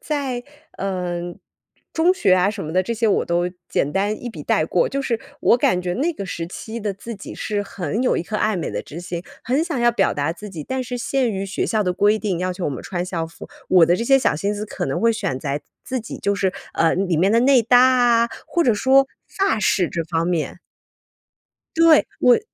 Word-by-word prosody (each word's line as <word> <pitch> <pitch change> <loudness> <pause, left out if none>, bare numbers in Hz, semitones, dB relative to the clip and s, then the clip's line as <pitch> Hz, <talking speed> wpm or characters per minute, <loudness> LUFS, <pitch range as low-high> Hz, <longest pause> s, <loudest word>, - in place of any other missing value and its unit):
在， 275 -5 -2 0.4
嗯， 175 -2 -3 0.5
中 335 +3 +3
学 200 - +3
啊 185 +1 +3
什 205 -4 -6
么 155 - -5
的， 185 - +3
这 235 +5 -3
些 225 0 +1
我 205 - +2
都 175 +1 0 0.2
简 145 - 0
单 205 +2 -1
一 245 - -4
笔 155 -10 -8
带 155 - +1
过， 175 - +1
就 275 - -2
是 230 -4 -1 0.2
我 235 - +5
感 180 -6 +2
觉 180 0 -2
那 305 - 0
个 200 - -6
时 165 -1 -4
期 220 +6 -7
的 205 -2 -2
自 230 +4 -8
己 195 - -9
是 205 -1 -2
很 200 - -3
有 255 - +2
一 - - -1
颗 215 +5 -4
爱 215 -1 +1
美 170 - -3
的 - - -3
之 160 +4 -9
心， 175 -1 -5 0.2
很 265 +5 +1
想 330 -8 -3
要 240 0 +5
表 235 - +1
达 145 +2 -1
自 210 +5 -10
己。 170 -6 -7
但 260 - -3
是 245 +1 -4
限 255 -1 0
于 195 -1 -3
学 195 - -2
校 215 -1 +1
的 180 -2 0
规 205 +3 +3
定， 195 -6 -2
要 185 0 -1
求 180 0 -5
我 - - 0
们 135 - -6
穿 180 -1 -3
校 170 -3 -3
服， 165 - -12 0.2
我 180 -3 +6
的 175 +2 +3
这 230 - -2
些 270 +2 +5
小 155 - +1
心 200 +6 -1
思 210 +1 -4
可 - - -4
能 - - -2
会 230 0 +4
选 130 -11 -2
在 145 +1 -3 0.2
自 255 -1 -3
己 215 - -8
就 200 - 0
是， 195 -2 0 0.2
呃， 165 - +3
里 180 -3 0
面 190 +5 +3
的 230 - +4
内 260 -1 +5
搭 245 +2 +5
啊， 245 -2 +4 0.2
或 345 - +1
者 245 - +4
说 265 +5 +4 0.2
发 390 - 0
饰 190 -3 +2
这 165 -1 -3
方 165 0 -1
面。 170 -3 -1 1.2
对， 330 -2 +6 0.2
我 250 -1 +6
205 Hz, 255 characters per minute, -21 LUFS, 175-245 Hz, 1.2 s, 我